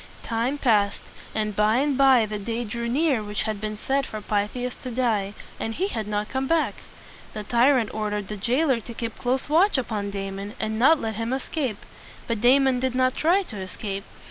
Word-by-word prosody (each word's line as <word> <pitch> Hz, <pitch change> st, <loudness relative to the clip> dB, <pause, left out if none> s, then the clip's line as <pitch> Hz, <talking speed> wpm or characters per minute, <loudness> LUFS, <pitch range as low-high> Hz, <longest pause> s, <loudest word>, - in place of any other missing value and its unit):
Time 235 Hz, +5 st, -1 dB
passed, 210 Hz, -7 st, +2 dB, 0.3 s
and 215 Hz, -1 st, -1 dB
by 210 Hz, +3 st, +3 dB
and 280 Hz, +1 st, +1 dB
by 265 Hz, -4 st, +5 dB
the 210 Hz, 0 st, -4 dB
day 230 Hz, +3 st, -3 dB
drew 235 Hz, +1 st, -4 dB
near 275 Hz, -2 st, +2 dB
which 210 Hz, 0 st, -3 dB
had 215 Hz, -2 st, -3 dB
been 215 Hz, 0 st, -3 dB
set 275 Hz, +5 st, 0 dB
for 215 Hz, -, -6 dB
Pythias 210 Hz, +4 st, -2 dB
to 255 Hz, -, -7 dB
die; 220 Hz, -5 st, 0 dB, 0.2 s
and 225 Hz, 0 st, -3 dB
he 385 Hz, +3 st, 0 dB
had 220 Hz, -, -3 dB
not 210 Hz, 0 st, -1 dB
come 265 Hz, +2 st, -2 dB
back. 330 Hz, 0 st, +2 dB, 0.6 s
The 215 Hz, -, -4 dB
tyrant 240 Hz, +1 st, +3 dB
ordered 210 Hz, -2 st, -2 dB
the 210 Hz, -, -5 dB
jailer 250 Hz, +5 st, +1 dB
to 235 Hz, +1 st, -10 dB
keep 230 Hz, -1 st, -4 dB
close 255 Hz, +1 st, 0 dB
watch 335 Hz, +5 st, +4 dB
upon 215 Hz, -5 st, -2 dB
Damon, 195 Hz, +1 st, -5 dB
and 220 Hz, 0 st, -2 dB
not 295 Hz, +6 st, +6 dB
let 220 Hz, -4 st, -3 dB
him 230 Hz, +1 st, -2 dB
escape. 265 Hz, -4 st, -3 dB, 0.4 s
But 230 Hz, -3 st, -2 dB
Damon 260 Hz, +1 st, +5 dB
did 260 Hz, 0 st, -1 dB
not 255 Hz, 0 st, +3 dB
try 360 Hz, +5 st, +3 dB
to 220 Hz, -, -8 dB
escape. 195 Hz, +1 st, -5 dB
230 Hz, 195 wpm, -25 LUFS, 210-260 Hz, 0.6 s, not